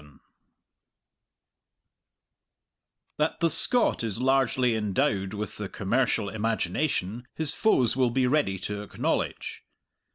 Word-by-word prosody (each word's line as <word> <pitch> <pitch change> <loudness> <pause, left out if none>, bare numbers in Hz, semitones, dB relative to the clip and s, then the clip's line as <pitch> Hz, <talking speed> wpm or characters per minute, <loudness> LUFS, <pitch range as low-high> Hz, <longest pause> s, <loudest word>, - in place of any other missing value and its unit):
That 150 +2 0
the 165 -1 +2
Scot 245 - +2
is 110 -3 -3
largely 130 -2 +2
endowed 105 -2 0
with 105 0 -5
the 105 -2 -5
commercial 115 +1 0
imagination 110 - -2
his 160 -1 +2
foes 130 - +2
will 130 -2 +2
be 130 +2 +1
ready 125 -7 +1
to 100 +2 -5
acknowledge. 105 - -3
120 Hz, 100 wpm, -27 LUFS, 105-135 Hz, -, the